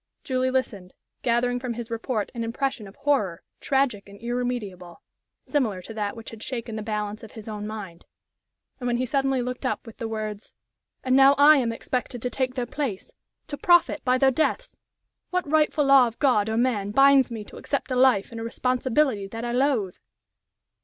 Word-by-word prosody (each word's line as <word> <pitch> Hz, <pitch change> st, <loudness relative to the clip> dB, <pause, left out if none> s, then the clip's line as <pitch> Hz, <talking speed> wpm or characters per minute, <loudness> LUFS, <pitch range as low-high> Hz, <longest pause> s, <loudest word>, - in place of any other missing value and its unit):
Julie 255 Hz, -2 st, 0 dB
listened, 210 Hz, -8 st, -2 dB, 0.3 s
gathering 245 Hz, +1 st, +1 dB
from 245 Hz, -2 st, -4 dB
his 235 Hz, 0 st, -7 dB
report 230 Hz, -2 st, -2 dB
an 235 Hz, -2 st, -3 dB
impression 230 Hz, -1 st, -2 dB
of 195 Hz, -, -14 dB
horror, 210 Hz, -13 st, 0 dB, 0.2 s
tragic 265 Hz, -8 st, 0 dB
and 200 Hz, 0 st, -13 dB
irremediable, 235 Hz, -8 st, -4 dB, 0.4 s
similar 235 Hz, -10 st, 0 dB
to 225 Hz, -, -9 dB
that 210 Hz, -1 st, -3 dB
which 225 Hz, -1 st, -9 dB
had 225 Hz, -1 st, -11 dB
shaken 235 Hz, -3 st, -5 dB
the 215 Hz, -, -4 dB
balance 210 Hz, -1 st, -3 dB
of 220 Hz, -, -12 dB
his 220 Hz, -2 st, -10 dB
own 210 Hz, -1 st, -5 dB
mind. 200 Hz, -6 st, -8 dB, 0.7 s
And 245 Hz, -, -3 dB
when 240 Hz, 0 st, +1 dB
he 255 Hz, -, 0 dB
suddenly 270 Hz, -1 st, 0 dB
looked 250 Hz, +2 st, -5 dB
up 255 Hz, -, -2 dB
with 230 Hz, -, -12 dB
the 230 Hz, -, -4 dB
words, 215 Hz, -1 st, -5 dB, 0.5 s
"And 255 Hz, 0 st, +2 dB
now 270 Hz, +1 st, +7 dB
I 295 Hz, +2 st, +8 dB
am 240 Hz, -4 st, +1 dB
expected 245 Hz, +1 st, -3 dB
to 250 Hz, -, -2 dB
take 255 Hz, +1 st, -1 dB
their 250 Hz, -2 st, -1 dB
place 245 Hz, -6 st, -4 dB, 0.3 s
to 290 Hz, -, -6 dB
profit 345 Hz, -1 st, +4 dB
by 255 Hz, 0 st, +3 dB
their 265 Hz, 0 st, +4 dB
deaths! 320 Hz, -, -1 dB, 0.5 s
What 365 Hz, -3 st, -1 dB
rightful 305 Hz, 0 st, +2 dB
law 275 Hz, -2 st, +7 dB
of 230 Hz, -, -8 dB
God 220 Hz, -7 st, +2 dB
or 220 Hz, -, -1 dB
man 230 Hz, -5 st, +1 dB
binds 275 Hz, +3 st, +5 dB
me 225 Hz, -3 st, -6 dB
to -, -, -13 dB
accept 280 Hz, -1 st, -3 dB
a -, -, +1 dB
life 250 Hz, -6 st, +3 dB
and 230 Hz, -1 st, -6 dB
a -, -, -4 dB
responsibility 250 Hz, -2 st, 0 dB
that 225 Hz, +4 st, -6 dB
I 240 Hz, -, -2 dB
loathe?" 245 Hz, -7 st, +1 dB
245 Hz, 195 wpm, -25 LUFS, 215-265 Hz, 0.7 s, I